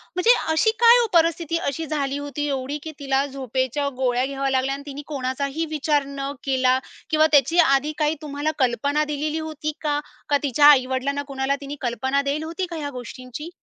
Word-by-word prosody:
म्हणजे 450 +7 +5 0.2
अशी 380 +8 +3
काय 470 +1 +9
हो 465 - +2
परिस्थिती 330 -1 +2
अशी 320 +4 -4
झाली 280 -2 -2
होती 290 +1 -4
एवढी, 275 +1 -2
की 315 - -6
तिला 275 0 +1
झोपेच्या 265 +1 -2
गोळ्या 250 0 +2
घ्याव्या 275 0 -2
लागल्या 265 +1 +1
आणि 280 - -9
तिनी 285 0 -7
कोणाचाही 280 +2 -2
विचार 295 -1 +1
न 275 0 -4
केला 260 -1 +2 0.3
किंवा 310 0 +4
त्याची 285 +4 +4
आधी 280 -2 +4
काही 305 0 +1
तुम्हाला 290 +1 -2
कल्पना 270 +4 +1
दिलेली 300 +1 -2
होती 310 -1 -4
का? 295 -1 0 0.3
का 285 - +4
तिच्या 285 +1 +3
आई-वडिलांना 270 0 +3
कोणाला 275 0 -1
तिने 280 +1 -6
कल्पना 265 +3 0
दिली 285 +2 -2
होती 335 +4 -3
का - - -4
ह्या 290 -2 -4
गोष्टींची? 255 +4 -8
280 Hz, 180 wpm, -23 LUFS, 270-305 Hz, 0.3 s, काय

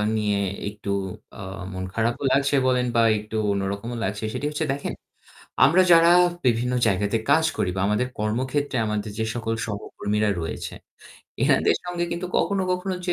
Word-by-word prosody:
নিয়ে 105 -2 +1 0.3
একটু 105 -1 -8 0.5
আ - - -11 0.3
মন 95 0 -4
খারাপও 115 +4 0
লাগছে 140 +1 +3
বলেন 125 -1 +2
বা 115 - +5 0.2
একটু 105 +1 -8 0.2
অন্যরকমও 100 +4 -3
লাগছে। 105 +3 -3
সেটি - - -3
হচ্ছে 150 +1 -2
দেখেন 140 - -4 0.7
আমরা 170 +7 +5
যারা 170 0 +7 0.3
বিভিন্ন 125 +1 +2
জায়গাতে 100 +1 +1
কাজ 160 +2 +5
করি 105 -4 0
বা 95 - -1
আমাদের 105 +5 +1
কর্মক্ষেত্রে 130 +6 -1
আমাদের 105 0 -2
যে 110 - +1
সকল 115 -1 -2
সহকর্মীরা 105 0 -2
রয়েছে। 80 - -5 0.7
এনাদের - - +3
সঙ্গে 175 -1 -2
কিন্তু 170 +2 -3
কখনো, 200 -1 +1
কখনো 185 +1 -2
যে 175 - +2
115 Hz, 155 wpm, -24 LUFS, 105-145 Hz, 0.7 s, যারা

